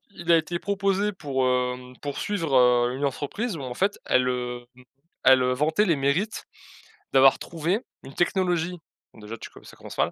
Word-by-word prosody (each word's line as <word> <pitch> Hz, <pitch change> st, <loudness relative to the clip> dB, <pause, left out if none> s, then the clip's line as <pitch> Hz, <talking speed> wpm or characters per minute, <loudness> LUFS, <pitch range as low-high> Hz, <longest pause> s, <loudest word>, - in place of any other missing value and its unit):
il 170 Hz, 0 st, -1 dB
a 165 Hz, -, +7 dB
été 170 Hz, +2 st, -2 dB
proposé 200 Hz, +1 st, 0 dB
pour, 140 Hz, -8 st, -2 dB
hem, 125 Hz, 0 st, -1 dB
pour 145 Hz, -1 st, -5 dB
suivre, 165 Hz, -9 st, -1 dB
heu, 125 Hz, 0 st, +4 dB
une 140 Hz, +1 st, -1 dB
entreprise 165 Hz, -, -3 dB
où, -, -, -7 dB
en 125 Hz, -2 st, -5 dB
fait, 200 Hz, +8 st, 0 dB
elle, 125 Hz, 0 st, +2 dB
hem, 125 Hz, -1 st, -3 dB, 0.6 s
elle, 130 Hz, -1 st, +7 dB
heu, 125 Hz, -, +1 dB
vantait 155 Hz, +10 st, +1 dB
les 165 Hz, -6 st, +2 dB
mérites 155 Hz, +11 st, -1 dB, 0.7 s
d'avoir 135 Hz, 0 st, +6 dB
trouvé 170 Hz, +7 st, -2 dB, 0.2 s
une 135 Hz, +1 st, -12 dB
technologie, 175 Hz, -1 st, 0 dB, 0.3 s
donc 110 Hz, -, -16 dB
déjà, 115 Hz, +2 st, -7 dB
tu -, -, -9 dB
co -, -, -16 dB
ça -, -, -14 dB
commence -, -, -11 dB
mal -, -, +2 dB
145 Hz, 190 wpm, -25 LUFS, 125-180 Hz, 0.7 s, a